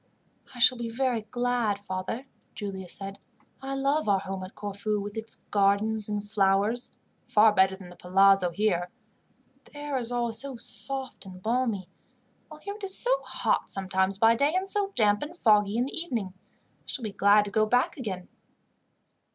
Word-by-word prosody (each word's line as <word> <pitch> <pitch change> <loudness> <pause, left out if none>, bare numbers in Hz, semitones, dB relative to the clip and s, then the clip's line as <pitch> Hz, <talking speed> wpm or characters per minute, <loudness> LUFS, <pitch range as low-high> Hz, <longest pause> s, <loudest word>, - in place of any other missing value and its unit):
"I - - -10
shall 245 0 +4
be 235 -1 -4
very 245 -1 -1
glad, 240 -1 -1
father," 200 +5 -5 0.3
Giulia 195 -3 -6
said. 195 +2 -7 0.4
"I 270 0 -4
love 275 -1 0
our 200 - +4
home 190 0 -5
at 185 - -10
Corfu, 205 +1 -3
with 205 +1 -6
its 220 0 -6 0.2
gardens 205 +2 +2
and 205 0 -3
flowers, 205 +3 +3 0.3
far 215 0 +5
better 190 -1 +3
than 190 -2 -12
the 180 - -13
palazzo 195 +1 +3
here. 175 -1 -1 0.8
The - - -16
air 290 -2 -3
is 240 -1 -5
always 240 0 0
soft 265 -3 0
and 185 -1 -11
balmy, 225 -3 -1 0.6
while 305 -1 -13
here 405 - -6
it 420 0 -13
is 380 -1 +1
so - - +4
hot - - -1
sometimes 190 0 0
by 225 +2 +5
day, 285 +8 +1
and 375 +1 0
so 400 0 +2
damp 205 -2 +3
and 315 +4 -7
foggy 210 -5 +3
in 245 - +1
the 275 - -6
evening. 235 - -3 0.5
I - - -37
shall 260 - -1
be 215 - -4
glad 205 +1 +4
to 200 - -7
go 215 +1 +2
back 245 +3 +1
again." 195 -9 -6
215 Hz, 175 wpm, -27 LUFS, 195-245 Hz, 0.8 s, far